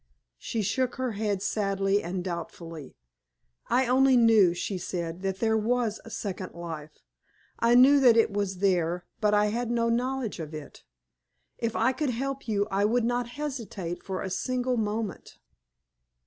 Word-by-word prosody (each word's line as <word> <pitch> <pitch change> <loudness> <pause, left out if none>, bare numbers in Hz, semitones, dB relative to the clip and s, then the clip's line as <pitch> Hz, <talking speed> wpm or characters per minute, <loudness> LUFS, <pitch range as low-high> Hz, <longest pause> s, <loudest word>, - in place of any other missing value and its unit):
She 225 -3 -2
shook 250 +5 0
her 255 -1 -2
head 205 -2 -2
sadly 195 -1 +1
and 180 +1 -4
doubtfully. 170 -4 -7 0.7
"I 255 +2 +3
only 260 +1 +4
knew," 220 -7 +5
she 185 +1 -3
said, 170 -1 -4
"that 190 -1 -2
there 220 +1 +1
was 225 0 0
a - - -11
second 190 -4 -5
life. 160 -3 -8 0.6
I 235 +1 +4
knew 270 +3 +7
that 245 -4 +6
it 225 -3 +3
was 200 -2 -1
there, 180 -2 +1
but 210 -1 +3
I 210 0 +3
had 240 0 -2
no 235 -1 +1
knowledge 245 -2 -1
of 155 -1 -6
it. 155 -1 -10 0.8
If 230 -1 -2
I - - +3
could 290 +1 -1
help 270 +3 -3
you 205 -2 +1
I 195 +1 +1
would 230 +3 +2
not 245 0 0
hesitate 225 - -4
for 190 -1 -4
a 190 - -4
single 255 +5 -1
moment." 215 -3 -3
210 Hz, 160 wpm, -27 LUFS, 190-245 Hz, 0.8 s, knew